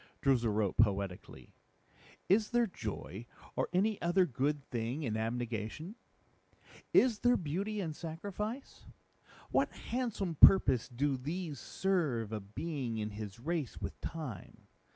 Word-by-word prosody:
Droozle 125 -5 +3
wrote 105 -2 0
poetically, 100 -4 0 0.7
"Is 210 +3 +4
there 240 0 +3
Joy 110 - -6 0.3
or - - 0
any 200 +4 +1
other 175 +2 +4
good 140 +1 -1
thing 120 +5 -2
in 110 -5 -1
Abnegation? 115 - -3 1.0
Is 240 -5 +5
there 245 0 +4
Beauty 195 +7 -2
in 165 -5 -2
Sacrifice? 205 - -6 0.6
What - - +2
Handsome 230 -8 -2
purpose 135 - +7
do 135 +2 0
these 155 +3 -4
serve 155 - 0
a 110 - -2
being 120 +4 -4
in 105 0 -2
his 105 0 -7
race 155 0 -2
with - - -6
Time? 145 - -6
145 Hz, 125 wpm, -33 LUFS, 115-185 Hz, 1.0 s, purpose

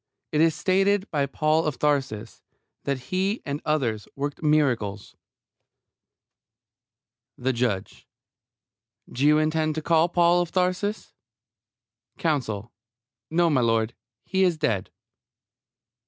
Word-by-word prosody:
It 150 - +2
is 165 -1 +4
stated 195 +2 +2
by 140 -3 +1
Paul 155 +3 +1
of 145 -5 -2
Tarsus 135 -8 -1 0.4
that 140 -1 0
he 195 +4 0
and 145 +1 -3
others 125 -9 -1
worked 145 +1 -4
miracles 125 -10 0 2.2
THE 130 +1 0
JUDGE: 115 -6 -2 1.0
Do 130 - -3
you 150 0 +6
intend 155 0 +1
to 155 - -3
call 165 +1 +3
Paul 175 0 +4
of 175 - -3
Tarsus? 185 +3 -1 1.0
COUNSEL: 120 -9 -2 0.6
No, 170 +1 +2
m'lud. 115 -4 +2 0.3
He 190 0 +1
is 175 -3 +2
dead. 105 -10 -1
150 Hz, 110 wpm, -25 LUFS, 125-170 Hz, 2.2 s, you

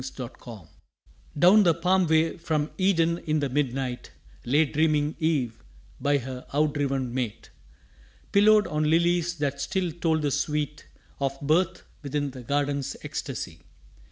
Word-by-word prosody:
THE 125 -3 -5
CRY 120 -2 -12
OF 105 - -11
EVE 80 - -20 0.7
Down 185 +7 +7
the 170 -5 +4
palm 180 +1 +2
way 160 +1 +2
from 155 -3 -2
Eden 170 -3 +2
in 155 -1 -1
the 140 -2 -1
mid 130 -2 0
night 130 -2 -4 0.4
Lay 145 +6 +3
dreaming 150 0 +1
Eve 130 -8 -1 0.4
by 145 0 +2
her 130 -1 -6
outdriven 140 -4 0
mate, 125 -5 -4 0.8
Pillowed 210 +1 +5
on 150 0 0
lilies 170 +1 +2
that 140 -3 -2
still 180 +1 -1
told 160 -1 0
the 145 - +1
sweet 150 +1 -2 0.3
Of 135 0 -2
birth 170 +5 +1 0.2
within 145 -1 -2
the 130 -1 -9
Garden's 140 +1 -1
ecstasy. 135 - -5
150 Hz, 150 wpm, -26 LUFS, 135-165 Hz, 0.8 s, Down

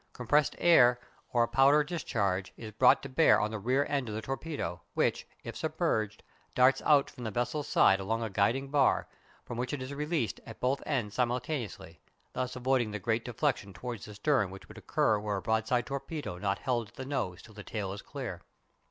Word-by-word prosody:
Compressed 145 +4 +2
air 125 -8 +6 0.3
or 120 -1 +3
a - - 0
powder 135 +5 +5
discharge 100 - -2
is 110 -2 -8
brought 125 +4 +5
to - - -4
bear 140 +5 +5
on 105 +1 -1
the 110 - -4
rear 130 +7 +1
end 140 -5 -1
of 105 - -4
the 110 - -3
torpedo, 135 - -4
which, - - +1 0.2
if - - -7
submerged, 110 -1 -1 0.3
darts 130 +1 +5
out 145 -2 +5
from 125 - -10
the 110 - -2
vessel's 125 +7 -2
side 95 - +4
along 110 +4 -1
a 110 - -2
guiding 125 +8 +1
bar, 145 -2 +3 0.4
from 120 - -6
which 125 +4 -2
it 145 - -2
is 130 +2 -6
released 150 -4 -2
at 110 - -11
both 130 +2 0
ends 120 -9 -1
simultaneously, 120 - -3 0.3
thus 125 0 -3
avoiding 125 -2 +1
the 105 - -4
great 110 +3 -1
deflection 120 -5 -1
towards 120 -2 -6
the 105 - -10
stern 110 -1 +2
which 95 +1 -11
would - - -11
occur 105 - +1
were 105 -1 -2
a - - -4
broadside 110 +3 +1
torpedo 140 - -5
not 100 0 0
held 120 -4 -1
at 105 - -22
the 130 - -6
nose 95 -10 -2
till 110 - -14
the 105 - -9
tail 100 -3 -4
is 100 - -7
clear. - - -6
120 Hz, 205 wpm, -30 LUFS, 105-135 Hz, 0.4 s, air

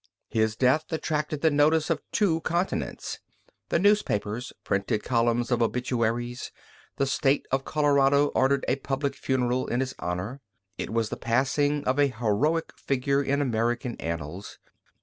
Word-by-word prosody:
His 110 -1 +1
death 130 +6 +3
attracted 150 -2 -2
the 160 - +4
notice 150 +2 +3
of - - 0
two 170 -6 +2
continents. 175 +4 -2 0.5
The - - +2
newspapers 130 - +1
printed 100 +2 -1
columns 120 0 +1
of 120 -1 +2
obituaries; 120 +1 -1 0.5
the 140 - +2
State 135 +1 +1
of 135 0 0
Colorado 145 -1 +3
ordered 135 +1 +2
a 135 - +1
public 140 +1 -2
funeral 130 -2 0
in 120 - -1
his 130 0 -2
honor; 95 +10 -4 0.3
it - - -4
was 115 -1 0
the - - -4
passing 140 +5 +1
of 130 +2 +1
a 145 - +5
heroic 125 +7 0
figure 140 +1 0
in 140 +1 +1
American 120 0 -1
annals. 85 +3 -5
130 Hz, 145 wpm, -27 LUFS, 115-145 Hz, 0.5 s, a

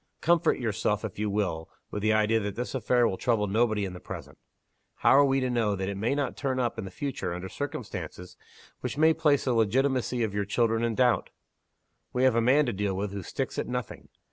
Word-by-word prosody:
Comfort 170 0 +3
yourself, 110 -2 -1
if 100 -2 -7
you 105 0 0
will, 90 -6 -2 0.2
with 105 - -3
the 110 +1 +2
idea 110 +1 +3
that 105 -2 -4
this 125 +2 -4
affair 125 -2 +2
will 95 - -2
trouble 115 -4 +1
nobody 110 0 +1
in 95 - -5
the 90 - -8
present. - - -9 0.6
How - - +3
are 140 +2 +7
we 135 0 +2
to 130 - 0
know 115 -4 +1
it 95 0 -3
may 110 +7 0
not 140 -3 -1
turn 130 -2 -2
up 120 -2 -1
in 105 - -4
the - - -6
future 95 -6 -4
under 90 +1 -5
circumstances 90 -8 -6 0.4
which - - -4
may 160 +1 +5
place 150 -3 +2
the 130 - +2
legitimacy 125 +2 +1
of 105 -3 -2
your 100 0 0
children 115 +2 +1
in 115 -1 0
doubt? 125 -1 +2 0.8
We 125 - +1
have 130 -2 +5
a 115 - +3
man 135 +6 +4
to 120 - -1
deal 100 -1 -1
with 100 +1 -2
who 100 0 -5
sticks - - -4
at - - -2
nothing. 125 -2 -5
115 Hz, 220 wpm, -28 LUFS, 100-130 Hz, 0.8 s, are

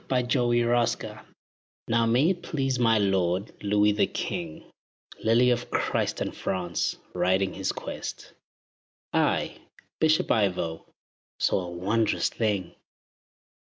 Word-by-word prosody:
IVO 125 -1 +1
OF 120 0 +2
CHARTRES - - -8 0.7
Now 115 0 +2
may 130 +10 +4
it 180 -2 -4
please 135 -5 -1
my 115 -2 +4
lord, 95 -1 +1
Louis 105 +1 +3
the 105 - +2
king, 80 -3 -4 0.6
Lily 120 +3 +4
of 120 0 -1
Christ - - -1
and - - -3
France! 90 -2 -2 0.2
riding 95 +1 +1
his 95 0 -2
quest, - - -7 0.8
I, - - +1 0.4
Bishop 160 0 +3
Ivo, 90 -6 0 0.5
saw 90 -2 +1
a - - -6
wondrous 100 +6 0
thing. 100 -6 -1
110 Hz, 120 wpm, -27 LUFS, 95-120 Hz, 0.8 s, may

